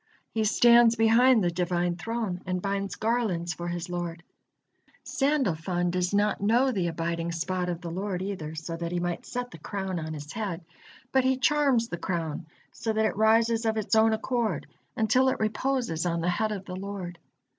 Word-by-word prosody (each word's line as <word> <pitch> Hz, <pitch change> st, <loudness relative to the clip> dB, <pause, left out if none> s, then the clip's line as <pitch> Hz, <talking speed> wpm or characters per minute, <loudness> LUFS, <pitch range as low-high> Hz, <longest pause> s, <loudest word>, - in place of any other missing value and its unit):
He 220 Hz, -1 st, 0 dB
stands 235 Hz, +1 st, +6 dB
behind 230 Hz, +1 st, +5 dB
the 175 Hz, -, +1 dB
Divine 175 Hz, 0 st, 0 dB
Throne 215 Hz, -2 st, -3 dB
and 180 Hz, 0 st, -1 dB
binds 200 Hz, +1 st, -2 dB
garlands 215 Hz, -7 st, 0 dB
for 175 Hz, +1 st, -6 dB
his 175 Hz, 0 st, -3 dB
Lord. 175 Hz, -1 st, -4 dB, 0.8 s
Sandalfon 180 Hz, -, 0 dB
does 180 Hz, 0 st, 0 dB
not 205 Hz, 0 st, +1 dB
know 240 Hz, +6 st, +3 dB
the 190 Hz, -7 st, 0 dB
abiding 170 Hz, 0 st, -2 dB
spot 180 Hz, +2 st, -2 dB
of 175 Hz, -1 st, -3 dB
the 170 Hz, -2 st, -5 dB
Lord 185 Hz, +1 st, -3 dB
either, 165 Hz, -6 st, -5 dB
so 160 Hz, +1 st, -5 dB
that 170 Hz, 0 st, -4 dB
he 175 Hz, -, -1 dB
might 175 Hz, -1 st, -3 dB
set 245 Hz, 0 st, -4 dB
the -, -, -11 dB
crown 190 Hz, -3 st, -3 dB
on 155 Hz, 0 st, -5 dB
His 145 Hz, +1 st, -8 dB
head, 190 Hz, -6 st, -4 dB, 0.5 s
but 265 Hz, -1 st, +3 dB
he 260 Hz, 0 st, +2 dB
charms 270 Hz, -4 st, +3 dB
the 170 Hz, -, -5 dB
crown, 165 Hz, -2 st, -3 dB, 0.2 s
so 225 Hz, -, -3 dB
that 220 Hz, 0 st, +2 dB
it -, -, 0 dB
rises 225 Hz, +2 st, +3 dB
of 220 Hz, -1 st, 0 dB
its 215 Hz, +1 st, -2 dB
own 220 Hz, 0 st, +5 dB
accord 220 Hz, -, -1 dB, 0.3 s
until 250 Hz, +4 st, +3 dB
it -, -, -2 dB
reposes 220 Hz, -5 st, -1 dB
on 170 Hz, -1 st, -1 dB
the 175 Hz, -, +1 dB
head 215 Hz, +4 st, 0 dB
of 195 Hz, -2 st, -5 dB
the 180 Hz, -, -6 dB
Lord. 185 Hz, -3 st, -6 dB
195 Hz, 190 wpm, -27 LUFS, 175-225 Hz, 0.8 s, stands